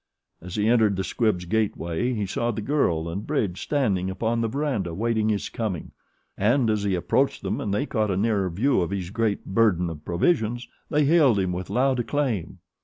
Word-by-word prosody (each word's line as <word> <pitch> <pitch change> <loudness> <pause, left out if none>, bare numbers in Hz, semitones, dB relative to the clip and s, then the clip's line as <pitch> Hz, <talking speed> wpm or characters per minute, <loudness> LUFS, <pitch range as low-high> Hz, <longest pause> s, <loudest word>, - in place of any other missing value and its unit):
As 90 +1 -8
he 105 0 +1
entered 110 -4 +4
the 95 - -2
Squibbs' 105 -5 0
gateway 110 +2 -1
he 105 -2 -1
saw 115 +5 -1
the 110 - -2
girl 90 - +1
and 95 +5 -5
Bridge 105 -12 -1
standing 100 -11 0
upon 115 +4 -1
the 115 - +1
verandah 115 - -2
waiting 110 0 0
his 105 -2 -1
coming, 105 -8 -4 0.4
and 115 +3 +2
as 105 -1 0
he 100 -2 0
approached 90 - 0
them - - -2
and 100 - -2
they 115 +8 0
caught 110 -7 0
a 95 - 0
nearer 100 -2 +1
view 105 +6 +1
of 85 - -1
his 95 -2 -4
great 110 -2 -1
burden 95 -5 +2
of 75 -2 -9
provisions 115 - 0 0.2
they 150 0 +2
hailed 145 -7 +5
him 95 -2 0
with 90 0 -5
loud 130 0 +2
acclaim. 120 - -1
110 Hz, 195 wpm, -25 LUFS, 95-120 Hz, 0.4 s, hailed